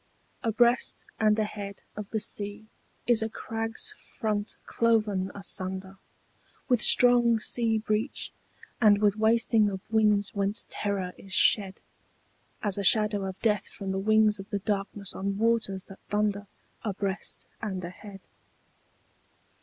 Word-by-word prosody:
ABREAST 240 +1 +2
and 215 -1 +3
ahead 205 -2 -4
of 210 -1 -7
the 220 - -1
sea 205 +1 -2 0.4
is 235 -2 +5
a 220 - -1
crag's 225 +1 -3 0.2
front 210 -2 -2
cloven 215 -5 +1
asunder 190 -1 -4 0.7
With 245 -4 +2
strong 240 -1 +5
sea 225 0 +2
breach 215 +4 -2 0.5
and 210 -2 +6
with 205 -1 +3
wasting 220 -1 +3
of 190 -1 -5
winds 210 -2 +2
whence 200 +1 0
terror 195 -3 -2
is 195 -1 -10
shed 195 -1 +3 0.8
As 205 -2 +2
a - - -2
shadow 210 0 +3
of 190 0 -6
death 210 -3 +1
from 195 -1 -6
the 190 - -1
wings 215 +1 +3
of 195 - -9
the 205 - -1
darkness 200 -1 -3
on 195 0 -3
waters 220 -4 0
that 195 - -13
thunder 205 -1 -1 0.3
Abreast 200 -2 -4 0.2
and 190 -5 -4
ahead. 195 +2 -10
210 Hz, 130 wpm, -27 LUFS, 195-220 Hz, 0.8 s, and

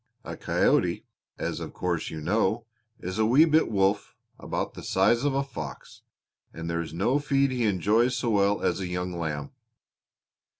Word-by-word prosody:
"A - - -6
coyote, - - +1 0.3
as - - -3
of - - -7
course 90 -3 -2
you 80 - -6
know, 105 +6 +1 0.3
is 95 +4 -5
a 110 - +4
wee 135 +8 +6
bit 160 0 +3
wolf, 100 -1 +1 0.2
about - - -3
the - - -9
size 120 +2 +2
of 145 -2 +1
a 140 - +1
fox, 75 - -8 0.5
and 85 0 -7
there 85 0 -1
is 80 - -6
no 100 - +1
feed 140 -2 +2
he 125 -2 0
enjoys 110 +6 +2
so 120 -1 0
well 100 -1 +2
as - - +1
a 95 - -3
young 90 0 -3
lamb. 75 -4 -4
100 Hz, 175 wpm, -27 LUFS, 90-125 Hz, 0.5 s, wee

